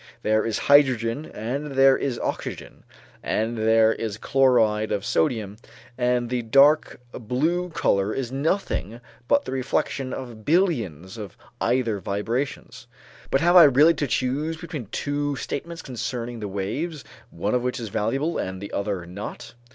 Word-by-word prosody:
There 110 0 +2
is 115 -2 -1
hydrogen 135 -1 +3
and 135 +7 -4
there 135 0 +6
is 130 -3 -2
oxygen, - - -5 0.4
and 110 +2 -1
there 110 0 +4
is 110 -2 -4
chloride 110 -5 +2
of 100 -1 -1
sodium, 105 +3 0 0.4
and 125 -1 0
the 125 -1 0
dark 140 +7 +4
blue 155 +10 -1
color 100 - +1
is 125 0 -3
nothing 135 - -2 0.3
but - - +3
the - - -5
reflection 130 0 -1
of 120 -5 -7
billions 115 - 0
of 100 -4 -8 0.3
ether 120 -4 +1
vibrations. 120 +5 -4 0.4
But 135 - +2
have 175 +2 +4
I 175 -3 +10
really 145 +4 +6
to 145 -2 -2
choose 135 +8 -1
between 160 - -7
two 145 +5 -2
statements 165 +5 -5
concerning 120 -1 -5
the 105 - -4
waves, 125 - -4 0.3
one 100 +3 -3
of 125 - +2
which 125 0 -2
is 115 -3 -5
valuable 135 +11 -1
and 95 0 -4
the 100 - -8
other 100 -3 -2
not? 95 +4 -8
125 Hz, 150 wpm, -24 LUFS, 110-140 Hz, 0.4 s, I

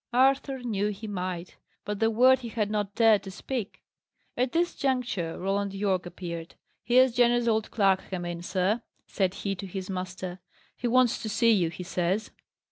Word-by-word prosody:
Arthur 265 +1 +2
knew 210 -4 0
he 210 +1 -5
might. 185 -3 -4 0.3
But 205 -1 -3
that 225 - +3
word 255 +4 +5
he 245 - -7
had 210 -2 -1
not 205 -2 -2
dared 225 -3 +5
to 195 - -8
speak. 220 +2 -5 0.5
At 250 0 0
this 345 +1 +1
juncture, 245 -11 -1
Roland 195 +1 -1
Yorke 195 -3 0
appeared. 170 -2 -7 0.3
"Here's 250 +2 +5
Jenner's 240 0 +3
old 220 -1 +1
clerk 195 -3 +2
come 180 -2 -4
in, 175 -1 -4
sir," 190 +5 0 0.2
said 190 -1 -1
he 200 - +1
to 195 +1 -7
his 190 +1 -5
master. 185 0 -5 0.4
"He 245 - -3
wants 245 0 +3
to 220 - -4
see 230 +2 +3
you, 180 -6 +3
he 175 +2 -7
says." 185 +4 -1
205 Hz, 180 wpm, -28 LUFS, 185-240 Hz, 0.5 s, word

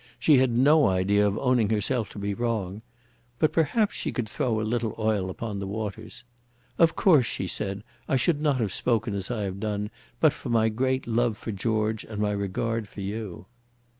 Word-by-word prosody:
She 140 +3 +5
had 125 -2 +2
no 150 +4 +5
idea 100 +2 +3
of 100 - -1
owning 125 -5 +2
herself 110 +2 0
to - - -12
be 100 0 -2
wrong. 110 -3 -2 0.6
But 155 - +2
perhaps 200 +7 +2
she - - -3
could 120 -3 -3
throw 115 -1 -1
a - - -1
little 115 0 -1
oil 110 -4 0
upon 105 +1 -5
the 100 - -4
waters. 110 +2 -6 0.6
"Of 165 -1 +5
course," 150 - +4
she - - -3
said, 100 +2 -3 0.2
"I - - +1
should 145 +4 +1
not 145 -4 +2
have 105 -5 -1
spoken 115 -3 0
as 100 -1 -4
I 115 -4 -2
have 95 0 -4
done 105 0 -2 0.3
but 155 -3 +5
for 140 - -8
my 110 -1 +3
great 130 +4 0
love 115 -1 +1
for 115 - -5
George 110 +1 -1
and 110 -2 -7
my 105 -1 +1
regard 105 +3 -2
for 100 - -9
you." 100 -2 -5
110 Hz, 195 wpm, -26 LUFS, 100-125 Hz, 0.6 s, She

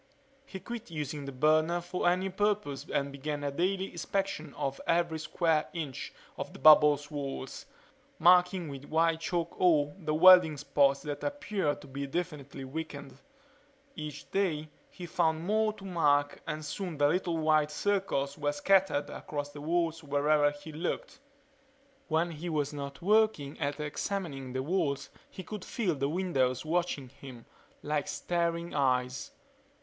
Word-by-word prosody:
He 190 - -7
quit 235 +1 -7
using 150 -2 -4
the 140 - -5
burner 155 +5 +3
for 175 0 0
any 185 +2 0
purpose 200 -7 -1
and 140 0 0
began 145 +1 -4
a 140 - -1
daily 190 +5 -1
inspection 170 -3 -3
of 135 0 -3
every 170 -1 +1
square 155 0 +1
inch 150 -7 -5 0.3
of - - -5
the - - -10
bubble's 150 -1 +6
walls, 140 -2 -5 0.5
marking 180 +1 +5
with 140 -1 -8
white 165 +1 +2
chalk 170 +1 -2
all 150 -5 +3
the 155 -3 -1
welding 180 -2 +8
spots 140 -1 +2
that 145 -1 -5
appeared 215 - -1
to - - -12
be 140 +1 -5
definitely 145 -4 -4
weakened. 140 -1 -6 0.8
Each 150 -2 -7
day 160 -6 0 0.2
he 180 - -9
found 160 -1 0
more 215 +2 +2
to 195 - -12
mark 145 -6 +2
and 155 -1 -4
soon 180 -2 -4
the 145 0 +4
little 175 +1 0
white 155 -1 +3
circles 150 -5 -1
were 145 0 0
scattered 180 -2 +2
across 145 -1 -5
the 145 0 -9
walls 165 +1 0
wherever 145 +1 +3
he 145 +2 -10
looked. 165 - -4 0.9
When 165 +1 +1
he 165 +2 -5
was 150 -2 -1
not 140 +2 -7
working 210 -8 +2
at 145 -1 -2
examining 150 -4 -4
the 130 0 -2
walls 145 -4 -1 0.2
he 185 - -8
could 205 +2 -7
feel 210 -8 -1
the 140 -1 -1
windows 140 -7 0
watching 160 -5 -1
him, 125 -2 -12 0.4
like 150 -1 -1
staring 170 0 -1
eyes. 130 - 0
155 Hz, 150 wpm, -30 LUFS, 145-175 Hz, 0.9 s, welding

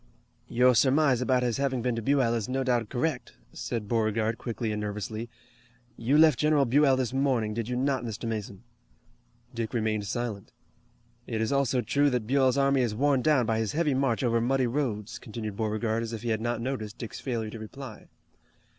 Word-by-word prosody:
"Your 125 +1 +4
surmise 135 +1 +3
about 125 0 +2
his 120 -2 0
having 135 -3 -1
been 125 -2 0
to 115 - -3
Buell 130 -1 +2
is 115 -2 -2
no 135 +1 0
doubt 120 -4 0
correct," 130 0 -2 0.2
said 110 -3 -4
Beauregard 110 0 0
quickly 115 -2 -3
and 105 0 -3
nervously. 110 +2 -4 0.7
"You 130 +6 +1
left 155 0 +6
General 150 -2 +3
Buell 135 +2 +4
this 130 -1 -1
morning, 130 -6 +1
did 115 +1 -3
you 125 - -1
not, 135 0 0
Mr. 115 0 -5
Mason?" 105 -2 -5 0.9
Dick 115 0 -4
remained 110 -2 -1
silent. 115 -3 -4 0.7
"It 115 -2 -2
is 110 +3 0
also 135 -2 +2
true 145 +5 +2
that 125 -4 -1
Buell's 130 +1 +2
army 140 -1 +3
is 115 -4 0
worn 135 +2 +2
down 140 -3 +3
by 110 0 0
his 110 -2 -1
heavy 150 -2 +1
march 130 -2 +1
over 115 -1 +2
muddy 130 +2 +2
roads," 115 -5 -2
continued 110 -2 -6
Beauregard 110 +1 -1
as 115 0 -4
if 115 - -6
he 120 - -2
had 110 -1 0
not 120 0 -1
noticed 115 -4 -4
Dick's 115 - -7
failure 115 -5 -3
to 115 - -8
reply. 110 +1 -9
120 Hz, 190 wpm, -28 LUFS, 110-135 Hz, 0.9 s, left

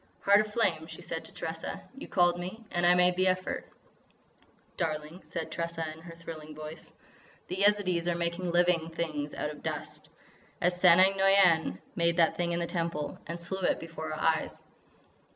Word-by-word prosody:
"Heart 200 +1 +6
of 215 0 -5
Flame," 170 -8 +1
she 175 - -10
said 165 -1 -5
to - - -11
Tressa, 165 -1 -5 0.2
"you 270 - -9
called 175 -1 +3
me 185 +6 -6
and 175 0 +2
I 175 - +6
made 180 0 +4
the 185 +1 +2
effort." 185 0 -1 1.1
"Darling," 155 +1 -3
said 165 -1 -5
Tressa 165 -1 -3
in 160 - -14
her 165 0 -11
thrilling 155 -2 -9
voice, 155 +1 -9 0.6
"the 185 - -3
Yezidees 195 -4 +3
are 175 - +1
making 170 +1 -2
living 175 -1 +2
things 155 -3 -4
out 150 - -2
of 150 - -11
dust,—as 180 0 -5
Sanang 185 +2 +7
Noïane 190 -4 +4 0.2
made 170 0 +2
that 165 -2 +4
thing 175 -1 -1
in 170 - 0
the 170 - 0
Temple.... 165 -4 -3
And 170 +1 -4
slew 180 +3 -4
it - - +1
before 160 -1 -6
our 155 - -4
eyes." 160 -1 0
170 Hz, 175 wpm, -29 LUFS, 160-180 Hz, 1.1 s, Sanang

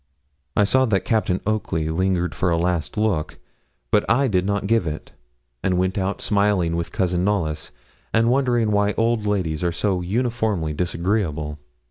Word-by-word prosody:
I 105 - +4
saw 130 +6 +3
that 100 -6 0
Captain 105 -5 +1
Oakley 80 -7 -1
lingered 90 +1 0
for 90 - 0
a 85 - +2
last 85 -2 -1
look, 105 -8 0 0.5
but 105 - +4
I 130 +4 +3
did 95 -4 +1
not 100 0 -1
give 115 -4 +2
it, 75 0 -5 0.5
and 90 +2 +1
went 95 +1 0
out 95 0 -2
smiling 100 -5 +2
with 85 0 -3
Cousin 90 -1 0
Knollys, 85 -7 -1 0.4
and 115 +1 +3
wondering 120 -4 +2
why 105 0 +2
old 115 -2 +1
ladies 90 -6 -1
are 85 - +1
so 95 +1 0
uniformly 110 -5 -1
disagreeable. 85 -3 -1
95 Hz, 160 wpm, -22 LUFS, 85-110 Hz, 0.5 s, I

